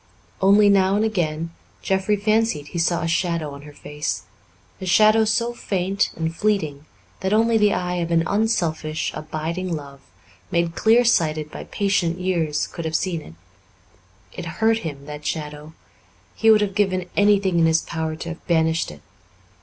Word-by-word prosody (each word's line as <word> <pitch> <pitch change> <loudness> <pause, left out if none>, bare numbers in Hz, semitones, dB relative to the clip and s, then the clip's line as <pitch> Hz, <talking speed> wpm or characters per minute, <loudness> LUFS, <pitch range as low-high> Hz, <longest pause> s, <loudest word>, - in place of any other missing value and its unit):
Only, 200 +2 +6
now 195 -1 +4
and 215 +1 +1
then, 165 -3 -2 0.3
Jeffrey 190 +2 +1
fancied 215 -7 0
he 170 - -4
saw 170 0 +1
a - - -1
shadow 170 -2 -1
on 140 0 -10
her 150 0 -12
face 150 -7 -4 0.6
a 185 - -5
shadow 215 +4 +5
so 235 +2 0
faint 195 -3 -1
and 165 0 -3
fleeting 160 -8 -1 0.3
that 190 +2 -1
only 230 +1 +3
the 210 -2 +4
eye 180 0 -2
of 170 -1 -2
an 165 -1 +3
unselfish, 170 -8 -1
abiding 165 +3 -4
love, 140 -2 -9 0.5
made 170 -1 0
clear 230 +6 +4
sighted 155 -8 +1
by - - -8
patient 195 -4 0
years, 170 -5 0
could 170 - -7
have 160 0 -2
seen 170 -1 -1
it. 80 - -13 1.0
It - - -7
hurt 225 0 +3
him, 145 -7 -7
that 150 0 -8
shadow; 150 0 -5 0.6
he 225 - +2
would 215 -1 +6
have 200 -2 -1
given 185 -3 0
anything 200 -3 +3
in 165 - +4
his 160 0 +2
power 160 -1 -3
to 165 +1 -7
have 170 - -9
banished 160 -1 +1
it. 75 -1 -12
170 Hz, 170 wpm, -22 LUFS, 155-205 Hz, 1.0 s, Only